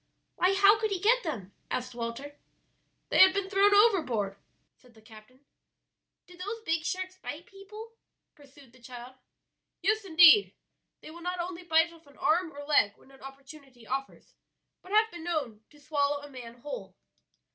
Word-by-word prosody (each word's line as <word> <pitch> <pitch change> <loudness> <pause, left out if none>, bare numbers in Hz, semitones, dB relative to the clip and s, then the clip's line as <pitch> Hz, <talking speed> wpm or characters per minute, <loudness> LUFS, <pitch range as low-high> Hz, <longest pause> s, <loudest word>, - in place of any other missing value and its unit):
"Why, 370 +2 +2
how 400 +2 +5
could 435 0 -1
he 390 -3 -2
get 465 +6 +3
them?" 215 - -6 0.2
asked 250 0 -4
Walter. 240 +5 -6 0.7
"They - - +2
had 375 0 +8
been 395 -1 -2
thrown 405 +1 +4
overboard," 300 - +2 0.4
said 245 -2 -24
the - - -18
captain. 225 +5 -17 0.8
"Do 360 - -16
those 415 +5 -6
big 325 -1 -1
sharks 370 +1 -4
bite 320 -1 -8
people?" 425 +4 -12 0.4
pursued 280 -3 -19
the 255 - -21
child. 245 +1 -10 0.7
"Yes, 430 +3 +1
indeed; 350 +2 +6 0.5
they - - -11
will 340 +2 -12
not 360 +1 -4
only 350 0 -5
bite 335 -1 +2
off 330 -2 -20
an 285 - -20
arm 335 +1 +1
or 285 0 -10
leg 210 -9 +3
when 270 - -22
an 270 - -19
opportunity 270 -2 -14
offers, 270 +3 -6 0.5
but 370 - -14
have 435 +1 +3
been 345 -2 -9
known 285 -11 -3
to 295 - -21
swallow 285 -1 -1
a 290 - -11
man 240 -2 -11
whole." 295 - -8
315 Hz, 170 wpm, -28 LUFS, 265-375 Hz, 0.8 s, had